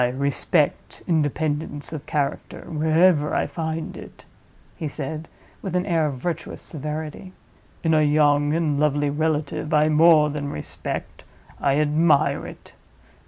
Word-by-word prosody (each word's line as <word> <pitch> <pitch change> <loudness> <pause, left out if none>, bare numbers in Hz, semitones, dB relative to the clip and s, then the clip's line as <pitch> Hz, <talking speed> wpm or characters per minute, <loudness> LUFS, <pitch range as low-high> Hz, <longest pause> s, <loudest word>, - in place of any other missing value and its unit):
"I 125 - +4
respect 140 +4 -1
independence 150 -2 -1
of 150 -1 -7
character 145 -2 -3
wherever 160 0 +3
I - - +1
find 160 -1 -4
it," - - -12 0.5
he 155 - -4
said, 155 +2 -5 0.3
with 190 -3 -4
an 180 0 +1
air 165 -5 +2
of 140 - -3
virtuous 165 +5 -4
severity. 155 +4 -6 0.5
"In 165 -1 +2
a 155 - +4
young 145 -1 +3
and 155 -4 0
lovely 145 -1 +1
relative, 155 0 -1
I 150 +1 +4
more 155 -1 +5
than 145 -1 -4
respect—I 135 - -4
admire 150 0 +2
it. - - -13
150 Hz, 130 wpm, -23 LUFS, 145-160 Hz, 0.5 s, more